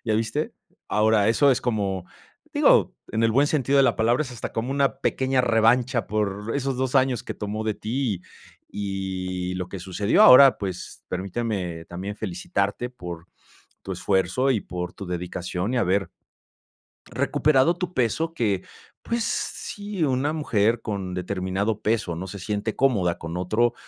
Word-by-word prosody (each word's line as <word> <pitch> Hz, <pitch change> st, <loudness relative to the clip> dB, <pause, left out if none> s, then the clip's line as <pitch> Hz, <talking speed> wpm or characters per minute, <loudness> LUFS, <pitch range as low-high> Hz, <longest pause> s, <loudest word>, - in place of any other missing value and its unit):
¿ya 110 Hz, -, +1 dB
viste?". 110 Hz, +1 st, -1 dB, 0.4 s
Ahora, 105 Hz, -1 st, +3 dB
eso 140 Hz, +5 st, +4 dB
es 130 Hz, -, +2 dB
como, 100 Hz, -6 st, -1 dB, 0.5 s
digo, -, -, +4 dB, 0.2 s
en 110 Hz, +1 st, 0 dB
el 115 Hz, -, +4 dB
buen 140 Hz, +5 st, +4 dB
sentido 140 Hz, -2 st, +1 dB
de -, -, +7 dB
la -, -, +2 dB
palabra, 120 Hz, +5 st, +2 dB
es 130 Hz, -, -8 dB
hasta 120 Hz, -, -6 dB
como 115 Hz, +3 st, -2 dB
una 135 Hz, -4 st, +1 dB
pequeña 130 Hz, 0 st, +1 dB
revancha 115 Hz, 0 st, +3 dB
por 105 Hz, +1 st, -2 dB
esos 135 Hz, -2 st, -1 dB
2 130 Hz, 0 st, -1 dB
años 130 Hz, -3 st, +3 dB
que -, -, -6 dB
tomó 105 Hz, +1 st, -4 dB
de 110 Hz, -1 st, 0 dB
ti 110 Hz, -3 st, -2 dB, 0.5 s
y 95 Hz, -2 st, -3 dB
lo 90 Hz, -1 st, -4 dB
que 95 Hz, -, -6 dB
sucedió. 95 Hz, +3 st, +2 dB
Ahora, 135 Hz, +1 st, +9 dB
pues, 95 Hz, -3 st, -6 dB
permíteme 95 Hz, -3 st, -3 dB
también 95 Hz, +4 st, -6 dB
felicitarte 100 Hz, +4 st, -2 dB
por 90 Hz, -8 st, -8 dB, 0.6 s
tu 95 Hz, -, -5 dB
esfuerzo 95 Hz, +8 st, +1 dB
y 115 Hz, -6 st, +2 dB
por 90 Hz, -1 st, -5 dB
tu 100 Hz, -, -8 dB
dedicación, 90 Hz, +4 st, -3 dB
y -, -, +2 dB
haber 95 Hz, -2 st, +1 dB, 1.0 s
recuperado 155 Hz, +3 st, +2 dB
tu 180 Hz, -1 st, -4 dB
peso 160 Hz, +6 st, 0 dB
que, 105 Hz, -, 0 dB, 0.4 s
pues, 235 Hz, -1 st, -1 dB
sí, 205 Hz, -2 st, -3 dB
una 135 Hz, +1 st, +1 dB
mujer 115 Hz, -7 st, +1 dB
con 100 Hz, -4 st, -4 dB
determinado 95 Hz, +3 st, -2 dB
peso 110 Hz, -6 st, 0 dB
no 90 Hz, +3 st, -5 dB
se 100 Hz, -, -7 dB
siente 105 Hz, +3 st, -3 dB
cómoda 100 Hz, -11 st, +2 dB
con 80 Hz, +1 st, -6 dB
otro 110 Hz, +7 st, +1 dB
110 Hz, 160 wpm, -24 LUFS, 95-125 Hz, 1.0 s, Ahora